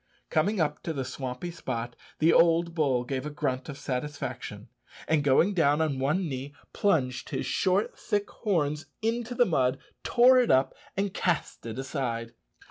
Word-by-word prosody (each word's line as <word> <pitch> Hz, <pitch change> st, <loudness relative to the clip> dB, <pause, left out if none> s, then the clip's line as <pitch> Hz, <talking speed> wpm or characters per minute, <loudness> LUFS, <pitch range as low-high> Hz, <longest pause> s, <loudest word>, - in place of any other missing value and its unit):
Coming 190 Hz, +6 st, +2 dB
up 150 Hz, -2 st, 0 dB
to 165 Hz, -, -3 dB
the 135 Hz, -3 st, -3 dB
swampy 130 Hz, +6 st, -5 dB
spot, 120 Hz, -7 st, -4 dB, 0.2 s
the 160 Hz, +2 st, +4 dB
old 170 Hz, 0 st, +4 dB
bull 140 Hz, -7 st, +1 dB
gave 130 Hz, +1 st, -3 dB
a -, -, -3 dB
grunt 135 Hz, -3 st, -2 dB
of 140 Hz, -, -6 dB
satisfaction, 140 Hz, +3 st, -5 dB, 0.4 s
and 155 Hz, -2 st, +2 dB
going 145 Hz, +8 st, +4 dB
down 150 Hz, -4 st, +3 dB
on 150 Hz, -4 st, 0 dB
one 155 Hz, +7 st, +1 dB
knee, 140 Hz, +1 st, -5 dB, 0.2 s
plunged 130 Hz, -11 st, +1 dB
his -, -, -2 dB
short 190 Hz, +2 st, +1 dB
thick 205 Hz, 0 st, -1 dB
horns 155 Hz, -8 st, -1 dB, 0.2 s
into 235 Hz, +2 st, -1 dB
the 245 Hz, -, +5 dB
mud, 130 Hz, -, +1 dB, 0.3 s
tore 255 Hz, +1 st, +6 dB
it 245 Hz, -, +2 dB
up, 130 Hz, +1 st, +3 dB, 0.2 s
and 195 Hz, -1 st, 0 dB
cast 170 Hz, -8 st, -1 dB
it 115 Hz, +1 st, -5 dB
aside. 120 Hz, -4 st, -3 dB
150 Hz, 165 wpm, -28 LUFS, 130-180 Hz, 0.4 s, tore